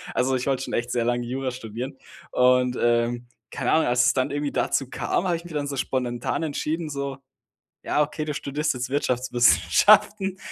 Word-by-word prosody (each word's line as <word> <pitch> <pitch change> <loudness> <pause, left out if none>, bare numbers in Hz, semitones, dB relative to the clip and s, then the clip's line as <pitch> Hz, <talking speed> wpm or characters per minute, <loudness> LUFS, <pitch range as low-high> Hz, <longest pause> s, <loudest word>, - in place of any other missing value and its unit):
Also, 130 +1 +1
ich 125 +2 -2
wollte 135 -1 0
schon - - -6
echt 120 +1 -1
sehr 120 -1 0
lange 120 0 0
Jura 130 +1 -2
studieren. 125 +2 -6 0.4
Und, 125 0 +3
ähm, 120 0 +1 0.2
keine 130 -3 -1
Ahnung, 160 - +4
als 125 +1 +3
es - - +4
dann 130 +1 0
irgendwie 145 0 -2
dazu 135 -2 0
kam, 185 - -1
habe 175 - +1
ich 165 - -6
mich 175 -2 -10
dann 145 -1 -2
so 140 - -4
spontan 125 +1 -2
entschieden, 155 +1 -2
so: 140 -1 -4 0.7
„Ja, 150 - +1
okay, 150 +1 -4
du 150 -1 -3
studierst 150 +2 -2
jetzt 125 0 -4
Wirtschaftswissenschaften“, 145 - +3
130 Hz, 190 wpm, -24 LUFS, 125-150 Hz, 0.7 s, Ahnung